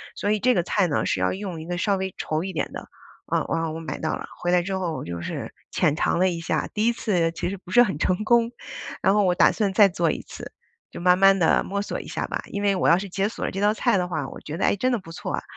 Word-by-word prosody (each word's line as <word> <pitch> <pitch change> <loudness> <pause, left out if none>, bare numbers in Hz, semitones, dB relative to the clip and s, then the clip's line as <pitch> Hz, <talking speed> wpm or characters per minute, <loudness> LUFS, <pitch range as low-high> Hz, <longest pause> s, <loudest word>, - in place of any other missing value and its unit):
所 205 - -1
以 215 - +1
这 250 +4 +3
个 175 - +2
菜 190 +1 +1
呢， 150 - 0
是 - - 0
要 95 - +1
用 185 -4 -5
一 160 - -9
个 175 0 -3
稍 195 +2 +1
微 190 0 -3
稠 155 0 -2
一 190 +2 -4
点 165 - -3
的， - - -8 0.4
呃， - - 0
然 165 - 0
后 160 -1 -2
我 160 - -5
买 165 - -5
到 160 - -1
了。 - - -7 0.2
回 175 - 0
来 180 -1 +3
之 190 +2 -3
后 175 -4 -3
就 85 0 -5
是 - - -5 0.2
浅 150 - +1
尝 - - +1
了 185 +2 +3
一 170 - -4
下， 160 -1 -1
第 215 +2 +1
一 235 - +3
次 180 -8 0
其 165 - -4
实 200 - -5
不 180 - -17
是 245 +6 +6
很 190 -11 -2
成 185 +4 +1
功， 235 +1 +3 0.5
然 190 - +4
后 205 0 +3
我 180 -2 +2
打 - - +5
算 205 -3 0
再 205 0 +7
做 170 -2 0
一 - - -2
次， - - -9 0.4
就 - - -9
慢 180 +1 +4
慢 195 0 +6
地 170 -4 +3
摸 200 +1 -3
索 - - -4
一 - - -12
下 - - -3
吧。 - - -3
因 200 0 -4
为 200 -1 +3
我 185 - +2
要 170 - +6
是 195 +2 -4
解 195 +2 -1
锁 - - -5
了 - - -2
这 195 - -4
道 205 +1 +4
菜 200 - +2
的 180 - -1
话， 155 -6 -3
我 - - -10
觉 155 - -6
得， - - +1
诶， - - +3
真 255 +6 0
的 245 - +2
不 175 -6 -11
错 - - -5
啊， - - -3
185 Hz, 330 characters per minute, -24 LUFS, 165-200 Hz, 0.5 s, 再